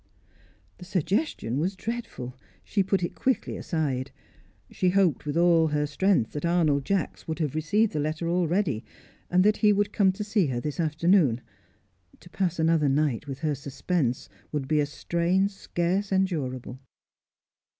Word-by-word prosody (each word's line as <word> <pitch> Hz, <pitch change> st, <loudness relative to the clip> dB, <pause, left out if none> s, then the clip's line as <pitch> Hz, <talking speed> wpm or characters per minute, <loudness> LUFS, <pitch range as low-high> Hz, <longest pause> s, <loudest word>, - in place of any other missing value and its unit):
The 180 Hz, -, -9 dB
suggestion 180 Hz, -, -1 dB
was 185 Hz, +5 st, -1 dB
dreadful; 190 Hz, -, -5 dB, 0.3 s
she 200 Hz, -, 0 dB
put 190 Hz, -1 st, 0 dB
it 175 Hz, -, -2 dB
quickly 260 Hz, -1 st, -1 dB
aside. 140 Hz, -6 st, -2 dB, 0.6 s
She 185 Hz, -, +1 dB
hoped 180 Hz, -7 st, +2 dB
with 145 Hz, -, -1 dB
all 170 Hz, -2 st, +5 dB
her 150 Hz, -1 st, 0 dB
strength 150 Hz, -, +1 dB
that 150 Hz, -, -5 dB
Arnold 160 Hz, -5 st, +2 dB
Jacks 195 Hz, -1 st, -2 dB
would 160 Hz, -, -3 dB
have 155 Hz, -5 st, -1 dB
received 200 Hz, +8 st, +1 dB
the 155 Hz, -, -1 dB
letter 155 Hz, +3 st, -2 dB
already, 170 Hz, -, +1 dB, 0.5 s
and 180 Hz, 0 st, +4 dB
that 210 Hz, +1 st, +3 dB
he 210 Hz, -2 st, +4 dB
would 205 Hz, 0 st, +1 dB
come 195 Hz, -2 st, +4 dB
to 210 Hz, -, -4 dB
see 205 Hz, -4 st, +1 dB
her 125 Hz, -3 st, -2 dB
this 150 Hz, +5 st, -4 dB
afternoon. 160 Hz, -, +3 dB, 0.8 s
To 175 Hz, -, -16 dB
pass 180 Hz, -3 st, -1 dB
another 160 Hz, -2 st, +3 dB
night 145 Hz, -1 st, 0 dB
with 135 Hz, +1 st, -6 dB
her 155 Hz, -2 st, +1 dB
suspense 140 Hz, 0 st, -2 dB, 0.2 s
would 145 Hz, -3 st, -2 dB
be 155 Hz, +1 st, +2 dB
a 145 Hz, -, +1 dB
strain 170 Hz, +6 st, 0 dB
scarce 195 Hz, 0 st, -2 dB
endurable. 140 Hz, -10 st, -1 dB
165 Hz, 160 wpm, -27 LUFS, 145-190 Hz, 0.8 s, all